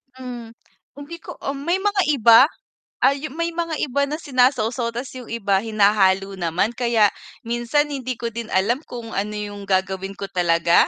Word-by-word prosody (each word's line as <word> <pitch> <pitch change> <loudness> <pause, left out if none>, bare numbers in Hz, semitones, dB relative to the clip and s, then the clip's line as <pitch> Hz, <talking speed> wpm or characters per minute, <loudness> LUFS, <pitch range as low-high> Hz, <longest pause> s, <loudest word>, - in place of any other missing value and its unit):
Hmm, 245 -3 -8 0.4
hindi 290 +4 -8
ko - - -9
ah, - - -2
may 340 +7 0
mga 410 -1 +2
iba, 230 +1 +7 0.6
ah, 275 - +5
yung 305 0 -7
may 335 0 -1
mga 335 -1 -2
iba 280 +1 0
na 295 - -3
sinasawsaw 250 -4 +1
ta's 250 +2 -5
yung 245 - -11
iba 200 -4 0
hinahalo 200 -3 +2
naman 175 +6 0
kaya, 230 -4 +3 0.3
minsan 240 +6 0
hindi 255 -2 -3
ko 235 0 -4
din 230 0 -6
alam 210 +7 +2
kung 235 -2 -8
ano 210 +2 -2
yung 205 -1 -6
gagawin 190 0 -1
ko 200 0 -6
talaga. 170 -2 +3
235 Hz, 170 wpm, -22 LUFS, 200-270 Hz, 0.6 s, iba